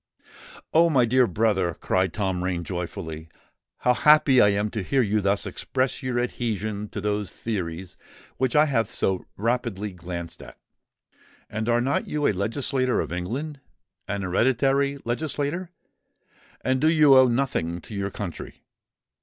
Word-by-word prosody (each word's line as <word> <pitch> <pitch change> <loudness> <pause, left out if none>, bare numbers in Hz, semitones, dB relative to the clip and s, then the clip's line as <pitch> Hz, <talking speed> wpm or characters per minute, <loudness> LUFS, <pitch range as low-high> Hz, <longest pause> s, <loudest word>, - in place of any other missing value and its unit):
"Oh! 170 +1 +5
my 130 -6 +4
dear 125 +1 +3
brother," 95 -3 +1
cried 95 -1 0
Tom 95 -3 -2
Rain 90 -2 -2
joyfully, 85 -2 -6 0.5
"how 125 - +4
happy 140 0 +5
I 105 - +6
am 100 +1 0
to 110 - -3
hear 130 +7 +1
you 105 0 +1
thus 100 +1 +1
express 130 0 -2
your 130 -2 -2
adhesion 110 -4 -3
to 105 - -5
those 105 -1 -1
theories 90 -5 -5 0.4
which 130 +1 0
I 150 +1 +6
have 115 -7 0
so 95 -6 -1
rapidly 110 -3 -2
glanced 85 -1 -7
at. - - -12 0.9
And 110 +2 -2
are 120 0 +3
not 135 +3 0
you 150 -1 -1
a - - +4
legislator 125 +6 0
of - - -3
England—an 100 - -6
hereditary 135 +8 +2
legislator? 150 +7 -2 0.9
and 130 +2 0
do 155 - +4
you 155 -4 +6
owe 130 -1 +7
nothing 115 -9 -1
to 110 - -11
your 100 -1 -2
country? 95 -3 -7
110 Hz, 145 wpm, -25 LUFS, 95-130 Hz, 0.9 s, owe